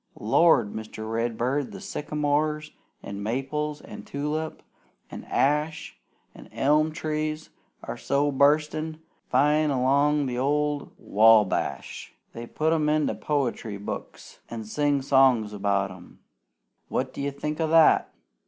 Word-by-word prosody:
Lord! 115 -1 +3
Mr. 110 0 -7
Redbird, 120 +4 -1
the 195 - -8
sycamores, 150 -4 -2 0.3
an' 100 0 -6
maples, 135 +7 -3
an' - - -10
tulip, 150 +2 -4 0.5
an' - - -8
ash, 150 +3 0 0.4
an' - - -14
elm 150 +3 +2
trees 155 0 -3 0.3
are - - -6
so 145 +1 0
bustin' 150 +3 +1 0.3
fine 150 +1 +3
'long 140 +2 +2
the 125 -2 -3
old 145 +1 0
Wabash 105 - +2 0.2
they 115 0 -7
put 155 +5 0
'em 155 -2 +1
into 155 0 +1
poetry 125 -7 -2
books 100 - -8
an' 115 -1 -6
sing 145 +5 0
songs 130 -6 +3
about 100 -1 0
'em. 90 -1 -14 0.7
What 130 0 -2
do - - -6
you 140 - -1
think 150 +3 -4
o' 160 - +1
that? 160 0 +5
145 Hz, 125 wpm, -26 LUFS, 115-150 Hz, 0.7 s, that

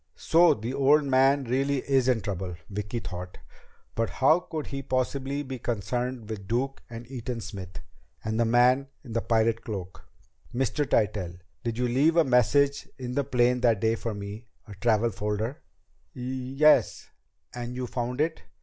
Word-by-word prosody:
So 170 +1 +5
the 115 +4 -4
old 145 +3 +4
man 135 +1 +3
really 135 +2 0
is 135 -2 +3
in 125 -4 +2
trouble, 95 -2 -4 0.2
Vicki 105 +3 -4
thought. 90 -3 -7 0.6
But 115 0 -1
how 155 +6 +4
could 160 -4 -5
he 135 -1 -5
possibly 135 +2 -1
be 130 -2 -6
connected 120 +2 -3
with 105 -3 -6
Duke 130 +5 -1
and 115 0 -8
Eaton 125 -2 -4
Smith 95 -4 -7 0.5
and 110 +1 -1
the - - +5
man 125 +4 +4 0.2
in 120 -5 -9
the 115 - 0
pirate 115 0 +1
cloak? 95 -4 -6 0.5
"Mr. 135 +3 0
Tytell, 95 -5 +1 0.3
did 115 -1 -2
you 125 0 +1
leave 145 +7 +3
a 165 - +7
message 140 +2 +3
in 125 -1 -5
the 140 - +1
plane 125 -1 +2
that 115 -4 +3
day 110 +2 +2
for 115 -1 -3
me? 100 +3 -7 0.2
A 105 - -9
travel 110 +3 +2
folder?" 105 +6 -3 0.5
"Y - - -8 0.3
yes. 150 +2 +4 0.4
And 120 0 -5
you 125 0 -3
found 125 +2 -2
it!" 160 +1 -1
120 Hz, 170 wpm, -27 LUFS, 110-135 Hz, 0.6 s, a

